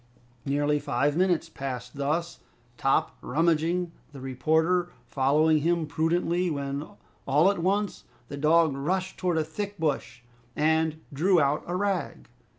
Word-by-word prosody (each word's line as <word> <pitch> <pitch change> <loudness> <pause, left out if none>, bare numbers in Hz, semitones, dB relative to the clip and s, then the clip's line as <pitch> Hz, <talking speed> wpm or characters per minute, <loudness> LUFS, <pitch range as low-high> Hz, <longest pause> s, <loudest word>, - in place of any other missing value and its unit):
Nearly 145 +1 +1
five 145 0 0
minutes 180 -1 +2
passed 125 -2 -6
thus, 155 +5 -2 0.4
Top 135 +3 +1
rummaging, 165 +4 +1 0.2
the 140 - -9
reporter 160 +7 +1 0.2
following 150 +3 +3
him 170 +1 +1
prudently 170 +4 0
when, 140 -1 -3 0.4
all 150 +8 +4
at 200 - -4
once, 200 +3 -1 0.2
the 140 - -6
dog 155 0 +3
rushed 185 +7 -2
towards 175 -3 +1
a - - -1
thick 205 +6 -5
bush, 135 -6 -2 0.3
and 160 0 +1
drew 175 +5 +3
out 145 0 +1
a 175 - -2
rag. 190 -5 -2
160 Hz, 135 wpm, -27 LUFS, 140-175 Hz, 0.4 s, all